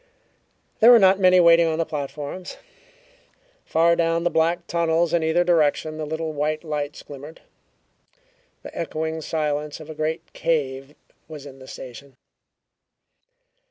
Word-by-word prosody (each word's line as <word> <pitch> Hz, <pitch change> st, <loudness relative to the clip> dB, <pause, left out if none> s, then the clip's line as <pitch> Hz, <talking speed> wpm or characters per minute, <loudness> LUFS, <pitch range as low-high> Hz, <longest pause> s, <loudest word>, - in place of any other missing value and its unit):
There 230 Hz, -, +7 dB
were 245 Hz, -, +9 dB
not 195 Hz, -2 st, +5 dB
many 185 Hz, -1 st, +5 dB
waiting 170 Hz, -1 st, +6 dB
on 160 Hz, -1 st, -1 dB
the 165 Hz, -, 0 dB
platforms. 150 Hz, +4 st, -6 dB, 1.1 s
Far 170 Hz, +1 st, +3 dB
down 165 Hz, 0 st, 0 dB
the 175 Hz, -, +1 dB
black 170 Hz, +2 st, +1 dB
tunnels 170 Hz, 0 st, 0 dB
in 170 Hz, -, +2 dB
either 160 Hz, +2 st, +2 dB
direction 155 Hz, -2 st, +1 dB
the 155 Hz, -, -4 dB
little 160 Hz, 0 st, -4 dB
white 155 Hz, +2 st, -2 dB
lights 150 Hz, -2 st, -4 dB
glimmered. 145 Hz, +3 st, -11 dB, 1.2 s
The -, -, -10 dB
echoing 160 Hz, 0 st, -3 dB
silence 150 Hz, -1 st, -3 dB
of 155 Hz, 0 st, -9 dB
a -, -, -7 dB
great 160 Hz, +2 st, -4 dB
cave 140 Hz, -3 st, -2 dB, 0.3 s
was 150 Hz, -3 st, -10 dB
in 135 Hz, -1 st, -12 dB
the 130 Hz, -, -13 dB
station. 130 Hz, +2 st, -11 dB
160 Hz, 140 wpm, -23 LUFS, 150-170 Hz, 1.2 s, were